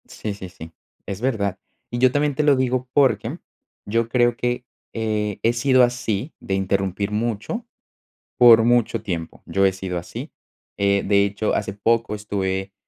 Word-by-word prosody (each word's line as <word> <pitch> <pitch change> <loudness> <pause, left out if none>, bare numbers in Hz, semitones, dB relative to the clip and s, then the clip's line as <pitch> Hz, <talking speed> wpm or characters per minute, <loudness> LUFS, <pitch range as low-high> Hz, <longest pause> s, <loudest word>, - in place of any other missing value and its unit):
Sí, 105 - -5
sí, 95 -2 -9
sí, 80 -3 -11 0.3
es 100 +1 -6
verdad. 100 -7 -1 0.3
Y 120 - -2
yo 130 0 +5
también 145 +1 +1
te 150 - +1
lo 145 -1 +5
digo 130 -1 -1
porque 140 -3 +2 0.5
yo 115 +2 0
creo 120 -1 +3
que, 120 +1 -2 0.3
eh, 105 -2 -2
he 115 - +3
sido 130 +1 +4
así, 120 +1 -1
de 95 - -4
interrumpir 95 +1 -1
mucho. 115 - -2 0.7
Por 115 -2 +8
mucho 120 -2 +2
tiempo, 85 -6 -5
yo 100 0 +1
he - - +2
sido 95 -2 -4
así, 85 - -8 0.5
eh, 100 0 +2
de 100 0 +4
hecho, 100 +2 -1
hace 100 -2 -1
poco 110 +1 0
estuve 95 -2 -3
110 Hz, 165 wpm, -22 LUFS, 100-120 Hz, 0.7 s, Por